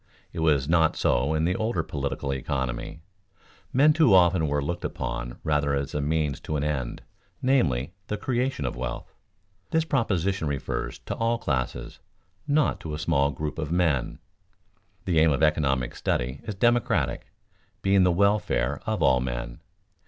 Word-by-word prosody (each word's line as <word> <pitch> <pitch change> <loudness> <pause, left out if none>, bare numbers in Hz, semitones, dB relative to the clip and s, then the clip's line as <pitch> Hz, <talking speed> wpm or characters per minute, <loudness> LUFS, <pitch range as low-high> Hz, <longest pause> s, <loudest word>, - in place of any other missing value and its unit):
It - - -5
was 75 -4 +2
not 80 -1 +3
so 70 +6 +1
in 80 +1 +1
the 90 +2 +1
older 110 -6 -1
political 70 -2 -3
economy; 65 +2 -3 0.7
men 145 +4 +5
too 150 - +5
often 85 -3 +4
were 75 0 0
looked 85 +4 -3
upon - - -4
rather 75 -2 +1
as 70 0 -3
a 75 - -1
means 75 -1 0
to 75 - -4
an 75 - -1
end, 70 -5 -3 0.4
namely, 85 - +1
the 105 - -2
creation 125 - -1
of 60 - -2
wealth. 65 +1 -5 0.6
This 160 0 +1
proposition 100 - 0
refers 70 -2 -3
to - - -3
all 115 +1 0
classes, 65 - -3 0.5
not 150 +1 +2
to 75 -2 -5
a - - -5
small 70 -2 +1
group 75 +3 -4
of 75 -1 -3
men. 80 -8 +1 0.9
The 85 -3 +2
aim 80 0 +5
of 70 +2 +1
economic 70 -5 +1
study 65 +3 -2
is 105 - -4
democratic, 120 +3 +1 0.6
being 95 0 +4
the 90 -1 +4
welfare 100 +3 +1
of - - 0
all 65 -1 +4
men. - - -4
75 Hz, 160 wpm, -26 LUFS, 70-95 Hz, 0.9 s, men